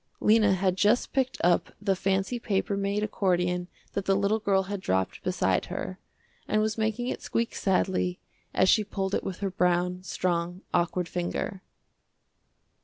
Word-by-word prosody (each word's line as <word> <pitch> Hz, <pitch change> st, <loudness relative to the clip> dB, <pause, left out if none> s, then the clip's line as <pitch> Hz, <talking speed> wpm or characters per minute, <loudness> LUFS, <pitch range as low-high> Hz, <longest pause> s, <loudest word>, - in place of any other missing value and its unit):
Lena 215 Hz, -2 st, +5 dB
had 185 Hz, 0 st, +1 dB
just 210 Hz, +5 st, +2 dB
picked 260 Hz, -1 st, 0 dB
up 175 Hz, 0 st, +2 dB
the 200 Hz, -2 st, +1 dB
fancy 195 Hz, +5 st, 0 dB
paper 200 Hz, -2 st, 0 dB
made 200 Hz, +1 st, 0 dB
accordion 180 Hz, -3 st, 0 dB, 0.3 s
that 200 Hz, -, -2 dB
the 195 Hz, -, +3 dB
little 200 Hz, +2 st, +2 dB
girl 195 Hz, -2 st, +2 dB
had 200 Hz, 0 st, -5 dB
dropped 95 Hz, -, -1 dB
beside -, -, +1 dB
her, -, -, -5 dB, 0.5 s
and 215 Hz, -, +2 dB
was 215 Hz, 0 st, +1 dB
making 220 Hz, +2 st, -1 dB
it -, -, -3 dB
squeak 230 Hz, 0 st, -1 dB
sadly 185 Hz, -2 st, 0 dB, 0.3 s
as 185 Hz, -, +3 dB
she 215 Hz, -, +5 dB
pulled 195 Hz, -1 st, -3 dB
it -, -, 0 dB
with 190 Hz, 0 st, -5 dB
her 195 Hz, -1 st, -1 dB
brown, 180 Hz, 0 st, +1 dB
strong, 175 Hz, -1 st, -2 dB
awkward 175 Hz, 0 st, +1 dB
finger. 180 Hz, +2 st, -3 dB
195 Hz, 160 wpm, -28 LUFS, 180-210 Hz, 0.5 s, Lena